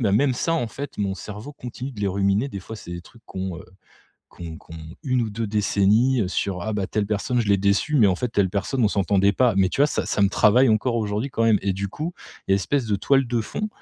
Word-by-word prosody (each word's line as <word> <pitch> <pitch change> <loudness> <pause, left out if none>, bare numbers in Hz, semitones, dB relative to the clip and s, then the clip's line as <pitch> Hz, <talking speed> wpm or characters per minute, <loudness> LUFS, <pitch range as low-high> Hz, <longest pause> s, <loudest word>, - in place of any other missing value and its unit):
même 120 +5 +3
ça 165 +7 0
en 155 - 0
fait, 140 +5 -7
mon 100 -2 -1
cerveau 105 +8 -8
continue 130 0 -7
de 105 - -9
les 100 - +1
ruminer 100 +6 +1
des 100 - -6
fois 110 - -9
c'est 85 - -10
des 85 - -6
trucs 115 +5 -19
qu'on, 95 -2 -5
heu, - - -11 0.7
qu'on 80 -2 -9
qu'on 80 - -13 0.3
1 130 -3 +1
ou 110 - -3
2 110 +2 -3
décennies, 105 +4 +2
heu, 95 - 0
sur, 95 0 -2
ah, 110 - -3
bah, 100 -2 -2
telle 105 -1 -1
personne 110 +4 0
je 110 - -4
l'ai 100 - +5
déçue 100 +9 +1
mais 110 -6 +6
en 95 - +2
fait 125 - -2
telle 100 -4 +1
personne 100 +7 -1
on 105 - +5
s'entendait 100 0 +2
pas. 120 0 +3
Mais 95 -1 +4
tu 135 - 0
vois 145 - +5
ça, - - -2
ça - - -1
me 100 - +4
travaille 115 +6 +4
encore 110 +3 +1
aujourd'hui 105 +4 -2
quand 115 - -1
même. 110 -3 +4
Et 100 -1 0
du 100 +1 -3
coup, 155 - -5 0.3
il - - +1
y - - +6
a - - +5
espèce 125 +7 0
de 105 -2 +1
toile 135 +4 +2
de 120 -1 0
fond, 210 - -4
105 Hz, 270 wpm, -23 LUFS, 100-125 Hz, 0.7 s, mais